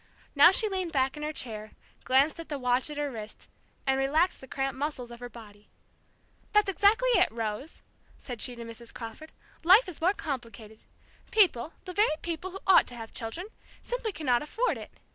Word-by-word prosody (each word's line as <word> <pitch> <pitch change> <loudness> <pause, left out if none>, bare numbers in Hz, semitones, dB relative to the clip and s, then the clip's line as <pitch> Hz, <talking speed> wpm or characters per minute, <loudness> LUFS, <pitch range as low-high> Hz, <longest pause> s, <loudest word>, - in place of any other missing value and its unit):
Now 290 +4 +8
she 435 +4 +3
leaned 375 -4 -2
back 265 -1 +1
in 300 - -8
her 300 0 -2
chair, 215 -7 -6 0.3
glanced 275 +5 +3
at 330 - -8
the 290 - -2
watch 250 +1 +1
at 300 - -7
her 290 -1 -1
wrist, 220 -3 -8 0.4
and 270 0 +2
relaxed 310 +7 +2
the 265 - -11
cramped 270 0 -3
muscles 275 -5 -3
of 235 - -10
her 245 0 -7
body. 210 -3 -14 0.8
"That's 420 -1 +5
exactly 430 +7 +3
it, 485 - +4
Rose," 225 +5 -5 0.3
said 245 -4 -7
she 250 - -1
to 235 - -8
Mrs. 230 0 -8
Crawford. 235 +7 -9 0.3
"Life 380 +8 +7
is 355 -4 -8
more 365 +4 +3
complicated. 230 - -6 0.5
People 355 - +3
the 365 - -6
very 410 -5 +3
people 340 +2 -3
who 385 +1 -9
ought 380 - +6
to 245 - -6
have 225 -1 -9
children 260 - -4 0.3
simply 480 -3 -3
cannot 255 -9 +1
afford 450 +11 0
it! - - -9
280 Hz, 190 wpm, -29 LUFS, 240-360 Hz, 0.8 s, Now